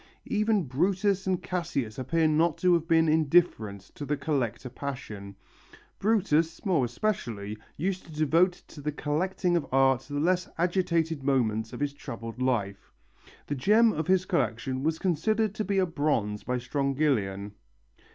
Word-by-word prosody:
Even 215 -2 +1
Brutus 190 +8 0
and 185 -2 0
Cassius 140 -11 -3
appear 160 +5 +1
not 155 +1 +2
to 180 -1 +3
have 165 -1 +1
been 165 -1 +4
indifferent 155 - +2
to - - -7
the 145 +1 -1
collector 135 -6 -2
passion. 120 -7 -7 0.6
Brutus, 170 -5 +1
more 170 -10 +2
especially, 115 - -3 0.2
used 185 +4 -2
to - - -12
devote 160 +4 +3 0.2
to 150 - -11
the 150 +1 -2
collecting 175 +5 -1
of 170 - 0
art 135 -1 +4
the 145 0 -2
less 180 +3 +1
agitated 170 -3 +1
moments 115 -5 0
of - - -7
his 145 -1 0
troubled 115 -3 -7
life. 105 -6 -1 0.5
The - - -3
gem 215 - +4
of 155 0 -3
his 185 0 +3
collection 130 - -1
was 160 +2 0
considered 200 +5 +1
to 215 - -2
be 200 -1 -1
a 190 - +4
bronze 145 - -1
by 125 0 -1
Strongylion. 125 -7 -1
150 Hz, 150 wpm, -28 LUFS, 125-180 Hz, 0.6 s, been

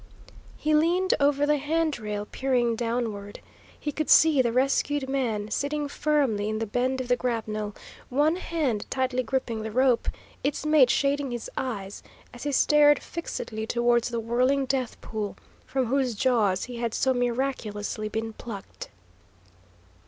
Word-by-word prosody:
He 305 0 0
leaned 345 +5 +3
over 285 0 +3
the 300 0 +3
hand 310 0 0
rail, 210 -1 -4
peering 245 -1 0
downward. 225 -3 -3 0.4
He 295 - -3
could 310 +1 -3
see 310 -4 +6
the 240 -2 +1
rescued 275 +2 +1
man 225 -6 -1
sitting 290 +4 -1
firmly 280 -9 0
in 215 - -1
the 225 - -1
bend 250 +4 0
of 255 - -3
the 245 - +3
grapnel, 215 -4 -3 0.3
one 295 +6 +2
hand 300 - -2
tightly 255 -1 0
gripping 240 -2 -2
the 220 - -4
rope, 250 +1 +2 0.4
its 285 +1 -1
mate 305 -5 +5
shading 280 +1 +1
his 240 -2 -5
eyes, 205 -6 -4 0.3
as 245 - -11
he 290 - -2
stared 295 +1 +5
fixedly 220 -9 -5
towards 240 0 +2
the 235 -1 -2
whirling 255 +4 +1
death 260 -2 -2
pool, 215 -2 -4 0.3
from 265 -1 0
whose 255 -1 0
jaws 210 -5 +2
he 245 -1 -6
had 235 -1 -2
so 265 - +2
miraculously 235 -4 -2
been 225 +1 -3
plucked. 215 -3 -8
250 Hz, 150 wpm, -26 LUFS, 225-280 Hz, 0.4 s, see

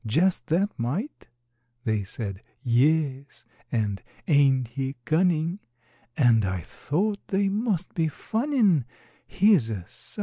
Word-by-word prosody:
Just 160 - +1
that 190 +6 +1
mite!" 160 - -3 0.6
They 110 -2 0
said, 100 0 -5 0.2
"Yes," 140 +1 +1 0.3
and, 105 -5 -1 0.3
"Ain't 135 -5 +4
he 135 +2 -3
cunnin'?" 170 +2 +1 0.6
And 120 -6 +5
I 95 -2 -1
thought 200 - -2
they 195 0 +1
must 205 -3 -1
be 165 -2 +1
funnin', 220 - +1 0.4
He's 190 - +4
a 100 -5 -4
_sight! - - -5
150 Hz, 115 wpm, -26 LUFS, 120-190 Hz, 0.6 s, And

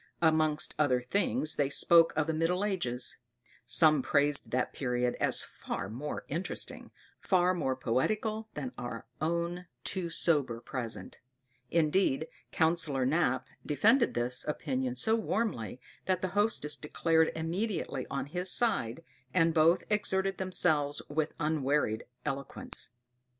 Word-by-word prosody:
Amongst 155 -1 +3
other 135 -4 +3
things 155 +3 0
they 140 -2 +2
spoke 165 +3 +6
of 155 - +1
the 160 - -1
middle 175 +5 +1
ages: 130 -12 0 0.5
some 155 +3 +5
praised 145 +1 +1
that 125 0 -1
period 125 -2 0
as - - +3
far 95 - -6
more 145 +6 -5
interesting, 170 +6 -3 0.3
far 185 -1 +2
more 135 -7 -1
poetical 215 - -1
than 255 - -4
our 120 -2 -6 0.2
own 170 +2 -1 0.2
too 180 -3 -2
sober 145 -8 +1
present; 120 -1 -5 0.5
indeed 160 -1 +2 0.2
Councillor 160 -5 +1
Knap 135 -2 +1 0.2
defended 225 - +3
this 120 +1 0
opinion 130 -4 -2
so 220 - +1
warmly, 210 - -1 0.3
that 185 -1 0
the 185 - 0
hostess 205 -6 +1
declared 160 +1 +1
immediately 165 - -2
on 140 - -2
his 180 +5 -2
side, 165 - 0 0.3
and 165 -2 +4
both 160 +1 +4
exerted 195 -2 0
themselves 155 -6 +1
with 150 +1 -1
unwearied 150 -7 0 0.2
eloquence. 140 -4 -4
155 Hz, 125 wpm, -31 LUFS, 135-180 Hz, 0.5 s, spoke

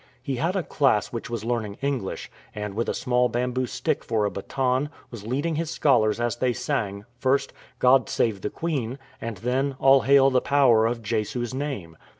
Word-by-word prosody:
He 135 -4 -2
had 170 +8 0
a 190 - 0
class 135 -10 +1
which 115 - -5
was 115 -2 -4
learning 115 -4 -2
English, 135 -7 -3 0.2
and 105 -1 -4
with 115 +3 -1
a - - 0
small 125 0 +1
bamboo 125 +2 -1
stick - - -2
for 110 -2 0
a 100 - -1
baton 130 +6 -1 0.2
was 110 -3 -8
leading 145 +6 -1
his 165 -1 -2
scholars 120 -9 +2
as 120 0 -1
they 125 0 +1
sang, 105 -6 -2
first 135 +1 +1
" - - -31
God 130 -2 +5
save 105 -5 0
the 105 - -2
Queen," 135 -7 -3 0.2
and 115 -3 -4
then 130 +6 -1
" - - -31
All 135 0 +6
hail 135 +3 +5
the 130 -1 +3
power 125 -6 +4
of 115 0 -3
Jesu's 115 +3 -2
name." 130 - -4
125 Hz, 195 wpm, -25 LUFS, 110-135 Hz, 0.2 s, All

